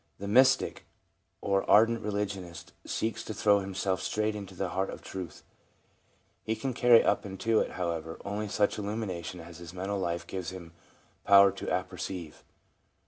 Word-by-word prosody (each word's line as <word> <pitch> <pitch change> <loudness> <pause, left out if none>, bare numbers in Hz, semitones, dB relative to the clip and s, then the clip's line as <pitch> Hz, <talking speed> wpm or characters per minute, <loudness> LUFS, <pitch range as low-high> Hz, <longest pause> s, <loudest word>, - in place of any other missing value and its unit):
The 100 - -6
mystic 130 +5 +3 0.5
or 100 -1 +1
ardent 115 +2 +5
religionist 95 -5 -4
seeks 110 0 -2
to 110 - -5
throw 105 -1 +4
himself 95 -1 -2
straight 105 0 -1
into 100 -2 -8
the 95 0 -2
heart 95 +2 -1
of - - -8
truth. 90 -4 -7 1.0
He 110 - -1
can 135 +2 -3
carry 120 -1 +6
up - - +2
into 105 +3 0
it, - - -1
however, 85 -2 -3
only 105 +1 -3
such 105 +1 +1
illumination 100 -5 -4
as 85 0 -11
his 85 +1 -10
mental 95 +2 -2
life 85 -2 -2
gives 90 -2 -5
him 90 -3 -10 0.5
power 100 0 +7
to - - -8
apperceive. 90 -2 -4
95 Hz, 155 wpm, -29 LUFS, 90-105 Hz, 1.0 s, power